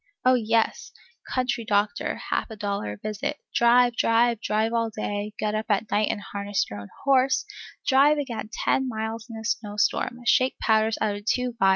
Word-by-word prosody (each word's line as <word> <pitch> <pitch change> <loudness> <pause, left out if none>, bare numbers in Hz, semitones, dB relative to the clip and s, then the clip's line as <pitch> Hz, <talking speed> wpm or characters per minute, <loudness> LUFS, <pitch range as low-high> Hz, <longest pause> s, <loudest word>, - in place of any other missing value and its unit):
Oh, 255 - +6
yes! 225 -2 +1 0.4
country 255 -2 0
doctor, 205 -1 0 0.2
half - - 0
a 220 - -7
dollar 200 - -3
a - - -10
visit, 215 - -4 0.2
drive, 240 0 +4
drive, 230 0 +2
drive 220 +1 0
all 230 -1 +1
day, 205 -1 -4
get 210 -1 -1
up 215 +1 -2
at 205 +1 0
night 210 +1 +2
and - - -1
harness 200 0 -2
your 105 - -6
own 100 0 -10
horse, 270 -1 +3 0.4
drive 285 +3 +5
again 235 -7 -4
ten 265 +1 0
miles 220 +1 -4
in 225 - -8
a 220 - -8
snow 210 -2 -2
storm, 210 +3 0
shake 255 +2 +3
powders 220 0 +2
out 210 -2 +1
of 205 - -12
two 250 +1 0
phials, - - -29
(pulv. 195 - +6
220 Hz, 195 wpm, -25 LUFS, 210-245 Hz, 0.4 s, Oh